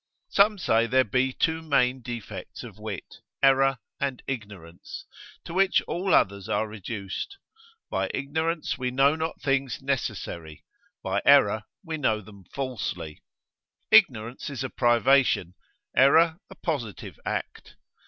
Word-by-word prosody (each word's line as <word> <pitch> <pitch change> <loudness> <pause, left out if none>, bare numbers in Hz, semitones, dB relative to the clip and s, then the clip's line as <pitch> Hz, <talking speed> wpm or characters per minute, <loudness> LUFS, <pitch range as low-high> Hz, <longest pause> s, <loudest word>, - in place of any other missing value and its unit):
Some 205 +1 +4
say 115 -10 +2
there 130 +2 +4
be 130 +4 +1
two 160 +4 0
main 130 -4 +1
defects 120 -2 -7
of 95 - -11
wit, 105 -3 -7 0.3
error 135 0 +5 0.2
and 135 -3 -2
ignorance, 100 -9 -7 0.4
to 165 - -7
which 190 +1 +4
all 185 +3 -2
others 100 0 +1
are 110 +2 0
reduced; 105 - -6 0.5
by - - -1
ignorance 160 +4 -2
we 125 0 -1
know 135 +4 +3
not 160 +1 -3
things 135 -3 0
necessary, 85 - -4 0.4
by 95 +1 0
error 110 -7 +5 0.2
we 160 -3 -4
know 110 -7 +1
them 100 -2 -14
falsely. 90 - -5 0.7
Ignorance 115 +7 +4
is 135 -2 -4
a 130 - -4
privation, 120 -6 +3 0.4
error 160 +5 +5
a - - -12
positive 125 - -4
act. - - -5
130 Hz, 130 wpm, -26 LUFS, 105-140 Hz, 0.7 s, error